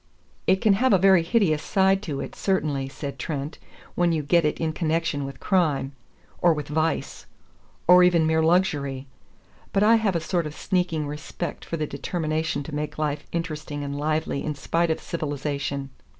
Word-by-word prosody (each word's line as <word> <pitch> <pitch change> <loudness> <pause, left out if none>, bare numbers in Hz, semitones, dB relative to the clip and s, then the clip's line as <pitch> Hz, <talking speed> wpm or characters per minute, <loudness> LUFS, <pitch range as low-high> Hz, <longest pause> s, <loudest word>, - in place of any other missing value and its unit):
"It 190 0 +3
can 215 - +5
have 250 +4 +3
a - - +7
very 190 -1 +5
hideous 165 -4 +2
side 190 +1 +2
to 145 -4 -3
it, - - -6
certainly," 145 -8 -1
said 140 -1 -7
Trent, 145 +1 -4 0.3
"when 175 -1 +2
you 160 -2 0
get 170 +3 +3
it 150 - 0
in 160 -1 -1
connection 160 -3 -1
with 135 - -8
crime. 155 -8 +1 0.5
Or 170 -2 +5
with 150 -1 -5
vice. 155 0 -1 0.6
Or 180 +1 +8
even 175 -3 +4
mere 160 0 +2
luxury. 150 -6 +1 0.7
But 200 - +2
I 225 +2 +6
have 210 -5 0
a - - +2
sort 170 0 -1
of 150 - -8
sneaking 175 -4 -1
respect 150 +4 -5
for 165 - -4
the 155 - -1
determination 155 0 -2
to 150 - -9
make 150 +1 -3
life 150 -1 -2
interesting 155 -3 -4
and 140 0 -4
lively 155 0 -1
in 150 - -3
spite 165 +4 0
of 160 - 0
civilization. 140 -3 -3
160 Hz, 180 wpm, -25 LUFS, 145-175 Hz, 0.7 s, Or